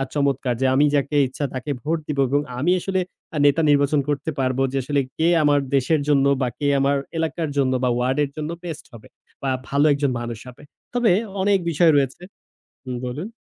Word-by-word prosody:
চমৎকার। 140 -3 0
যে - - +2
আমি 145 +2 +4
যাকে 140 +1 0
ইচ্ছা 140 +3 -4
তাকে 130 +3 -5
ভোট 165 +2 0
দিব 150 -2 -3
এবং 145 +2 +2 0.2
আমি 170 +6 +2
আসলে 190 +1 -1 0.4
আ - - -1
নেতা 145 +3 +4
নির্বাচন 145 0 +3
করতে 145 +2 -1
পারব 130 -1 0
যে 135 - -2
আসলে 145 +1 0 0.2
কে 160 - +2 0.2
আমার 145 -1 +4 0.2
দেশের 145 +3 +2
জন্য 140 -2 +3 0.2
বা 125 - +1
কে 145 - 0
আমার 140 +1 +2 0.2
এলাকার 160 -1 -2
জন্য 130 -2 +2
বা 125 - +3
ওয়ার্ডের 130 +4 0
জন্য 155 +1 -4
বেস্ট 165 -4 -7
হবে 115 -2 -13 0.4
বা 135 - 0 0.2
ভালো 140 +2 +2
একজন 140 -1 0
মানুষ 120 -2 -5
হবে। 125 +3 -13 0.3
তবে 240 -5 +3 0.3
অনেক 200 0 +3
বিষয় 165 +1 +4
রয়েছে 135 +3 -1 0.6
হুম 130 -1 -4
বলুন। 145 - -5
145 Hz, 190 wpm, -22 LUFS, 135-155 Hz, 0.6 s, আমি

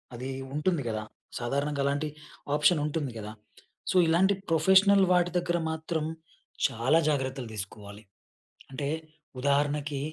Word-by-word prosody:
అది 125 +3 -5 0.2
ఉంటుంది 155 +2 0
కదా! 110 -1 -3 0.4
సాధారణంగా 140 +4 -1
అలాంటి 145 +2 0 0.5
ఆప్షన్ 150 +2 +4
ఉంటుంది 150 -3 -2
కదా! 105 0 -6 0.6
సో, - - -3
ఇలాంటి 180 +5 +4 0.2
ప్రొఫెషనల్ 190 +5 +5
వాటి 175 -1 +3
దగ్గర 175 0 -1
మాత్రం, 160 0 -2 0.6
చాలా 125 +8 +2
జాగ్రత్తలు 130 -4 -2
తీసుకోవాలి. 105 +1 -7 0.7
అంటే, 140 +1 -3 0.5
ఉదాహరణకి 145 +1 +1
145 Hz, 115 wpm, -28 LUFS, 130-165 Hz, 0.7 s, ప్రొఫెషనల్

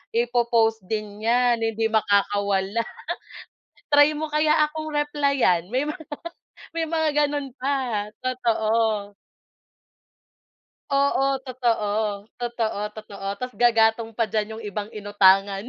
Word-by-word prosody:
i-po-post 235 -1 +2
din 210 -1 -4
'yan 240 +1 +2
hindi 225 0 -1
makakawala, 200 -1 +1 1.1
"Try 290 +1 +6
mo 310 +1 -4
kaya 305 0 +3 0.2
akong 310 0 -6
replyan," 280 - +1
may 280 +4 0
mga 310 +1 -6 0.7
may 325 - +1
mga 320 -1 0 0.2
ganun 285 -1 -3
pa, 255 -6 -1 0.2
totoo. 220 -4 0 1.8
Oo, 275 0 +2 0.2
totoo, 235 -5 0 0.5
totoo, 235 -3 -2 0.2
totoo 200 -2 -9
tas 250 0 -4
gagatong 225 -1 +4
pa 230 - +2
diyan 215 +1 -2
yung 230 - -8
ibang 205 +1 -4
inutangan. 200 -1 +3
230 Hz, 105 wpm, -24 LUFS, 210-275 Hz, 1.8 s, Try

